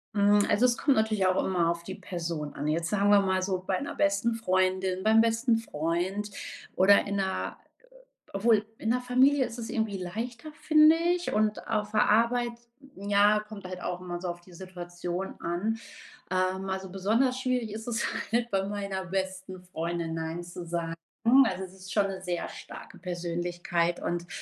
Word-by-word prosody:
Hm, 205 Hz, 0 st, +5 dB
also, 215 Hz, +5 st, +3 dB
es 240 Hz, -1 st, +3 dB
kommt 280 Hz, -2 st, +3 dB
natürlich 215 Hz, -3 st, +2 dB
auch 185 Hz, -, +2 dB
immer 175 Hz, -3 st, +1 dB
auf 170 Hz, 0 st, -2 dB
die 190 Hz, +1 st, -6 dB
Person 165 Hz, -5 st, -5 dB
an. 145 Hz, -, -4 dB
Jetzt 165 Hz, +2 st, 0 dB
sagen 205 Hz, 0 st, +2 dB
wir 205 Hz, -1 st, +7 dB
mal 190 Hz, -1 st, +1 dB
so, 185 Hz, -1 st, -2 dB
bei 185 Hz, -1 st, 0 dB
'ner -, -, -5 dB
besten 200 Hz, +4 st, +1 dB
Freundin, 185 Hz, -2 st, 0 dB
beim 220 Hz, +1 st, +6 dB
besten 230 Hz, +1 st, +2 dB
Freund 185 Hz, +2 st, -2 dB, 0.5 s
oder 200 Hz, +2 st, +6 dB
in 200 Hz, 0 st, -1 dB
der, 190 Hz, -1 st, -2 dB
äh -, -, -29 dB, 0.7 s
obwohl 215 Hz, 0 st, +3 dB
in 220 Hz, -, -1 dB
der 250 Hz, +1 st, +2 dB
Familie 260 Hz, +2 st, +4 dB
ist 230 Hz, -, -9 dB
es 225 Hz, -, -5 dB
irgendwie 220 Hz, -3 st, -1 dB
leichter, 230 Hz, -, -5 dB
finde 310 Hz, +1 st, +6 dB
ich, 350 Hz, +1 st, 0 dB
und 215 Hz, 0 st, 0 dB
auf 210 Hz, -1 st, -1 dB
der 210 Hz, -1 st, +3 dB
Arbeit, 235 Hz, +2 st, +3 dB, 0.5 s
ja, 205 Hz, +1 st, +4 dB
kommt 210 Hz, -2 st, -10 dB
halt 185 Hz, 0 st, -6 dB
auch 180 Hz, 0 st, -3 dB
immer 175 Hz, -1 st, -5 dB
so 180 Hz, -, -4 dB
auf 175 Hz, 0 st, -5 dB
die 180 Hz, +1 st, -18 dB
Situation 175 Hz, 0 st, -6 dB
an. 195 Hz, +7 st, -1 dB, 0.5 s
Ähm, 185 Hz, +1 st, 0 dB
also, 190 Hz, 0 st, -3 dB
besonders 225 Hz, +7 st, +1 dB
schwierig 250 Hz, -4 st, -1 dB
ist 220 Hz, +2 st, -7 dB
es 235 Hz, -1 st, 0 dB, 0.3 s
halt 240 Hz, 0 st, +1 dB
bei 195 Hz, 0 st, +1 dB
meiner 200 Hz, -2 st, -3 dB
besten 190 Hz, 0 st, -4 dB
Freundin, 170 Hz, -2 st, -3 dB
Nein 165 Hz, +1 st, -4 dB
zu 175 Hz, 0 st, -8 dB
sagen. 165 Hz, -1 st, -3 dB, 0.5 s
Also, 190 Hz, -3 st, -2 dB
es 185 Hz, 0 st, -9 dB
ist 190 Hz, 0 st, -11 dB
schon 205 Hz, -2 st, +3 dB
'ne 190 Hz, -1 st, -6 dB
sehr 180 Hz, -2 st, -3 dB
starke -, -, -11 dB
Persönlichkeit 175 Hz, -1 st, -2 dB
und 175 Hz, 0 st, -2 dB
190 Hz, 180 wpm, -28 LUFS, 180-220 Hz, 0.7 s, wir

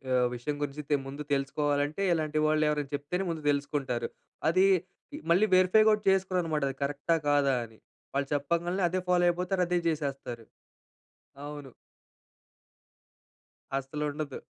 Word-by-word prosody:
ఆహ్, 125 Hz, -1 st, +4 dB
విషయం 145 Hz, +5 st, -3 dB
గురించి 145 Hz, +1 st, -4 dB
తె 145 Hz, -, +4 dB
ముందు 140 Hz, +2 st, -6 dB
తెలుసుకోవాలంటే 145 Hz, +4 st, 0 dB
ఇలాంటి 155 Hz, -1 st, 0 dB
వాళ్ళెవరైనా 150 Hz, -2 st, +1 dB
చెప్తేనే 170 Hz, +7 st, -3 dB
ముందు 160 Hz, -2 st, -4 dB
తెలుసుకుంటారు. 140 Hz, -4 st, -2 dB, 0.4 s
అది 185 Hz, +3 st, +4 dB, 0.7 s
మళ్ళీ 190 Hz, +5 st, +5 dB
వెరిఫై 185 Hz, +4 st, +5 dB
కూడా 210 Hz, -1 st, +3 dB
చేస్కొరన్నమాట. 180 Hz, -6 st, +1 dB
అది 135 Hz, -, -7 dB
కరెక్టా 145 Hz, +4 st, 0 dB
కాదా 140 Hz, -2 st, +3 dB
అని. 110 Hz, -1 st, -13 dB, 0.4 s
వాళ్ళు 140 Hz, 0 st, 0 dB
చెప్పంగానే 170 Hz, +6 st, -1 dB
అదే 185 Hz, +1 st, -1 dB
ఫాలో 175 Hz, 0 st, +4 dB
అయిపోతారు 180 Hz, +2 st, -1 dB
అదే 180 Hz, 0 st, +1 dB
చేసేస్తారు. 135 Hz, -7 st, -4 dB, 1.0 s
అవును. 145 Hz, -2 st, -7 dB, 2.1 s
అస్సలుండద్దు. 145 Hz, +1 st, -4 dB
150 Hz, 120 wpm, -29 LUFS, 140-175 Hz, 2.1 s, మళ్ళీ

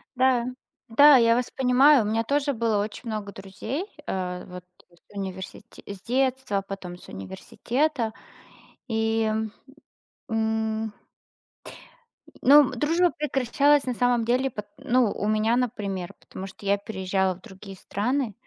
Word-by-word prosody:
Да, 255 Hz, -2 st, +3 dB, 0.4 s
да, 285 Hz, +5 st, +7 dB
я 230 Hz, -1 st, +4 dB
вас 250 Hz, 0 st, -1 dB
понимаю. 265 Hz, 0 st, +5 dB
У -, -, -3 dB
меня 225 Hz, +1 st, +1 dB
тоже 280 Hz, +3 st, 0 dB
было 225 Hz, -3 st, +1 dB
очень 220 Hz, +3 st, -6 dB
много 210 Hz, -2 st, -4 dB
друзей. 210 Hz, -, -5 dB, 0.2 s
А, 180 Hz, -1 st, -3 dB
вот, 180 Hz, 0 st, -10 dB, 0.3 s
э, 175 Hz, -, -24 dB
с 200 Hz, -, -23 dB
университе 190 Hz, +3 st, -7 dB
с 200 Hz, -1 st, -8 dB
детства, 255 Hz, -4 st, 0 dB
потом 180 Hz, -3 st, -7 dB
с -, -, -16 dB
университета. 230 Hz, -, -2 dB, 0.8 s
И, 225 Hz, -1 st, +1 dB, 1.0 s
м. 220 Hz, -1 st, -1 dB, 1.5 s
Но, 290 Hz, +3 st, +8 dB
м, 270 Hz, -1 st, 0 dB
дружба 330 Hz, +7 st, +2 dB
прекращалась 285 Hz, 0 st, +2 dB
на 250 Hz, -, -1 dB
самом 245 Hz, -1 st, +2 dB
деле 255 Hz, +3 st, +1 dB
пот 210 Hz, -3 st, -7 dB
ну, 255 Hz, -5 st, +2 dB
у 210 Hz, -, -3 dB
меня, 215 Hz, +2 st, +2 dB
например, 200 Hz, -7 st, -3 dB
потому 190 Hz, -, -9 dB
что 195 Hz, +1 st, -13 dB
я 200 Hz, +1 st, +3 dB
переезжала 190 Hz, -2 st, -1 dB
в 180 Hz, -, -19 dB
другие 195 Hz, -2 st, -11 dB
страны, 240 Hz, +4 st, -2 dB
225 Hz, 140 wpm, -25 LUFS, 200-255 Hz, 1.5 s, Но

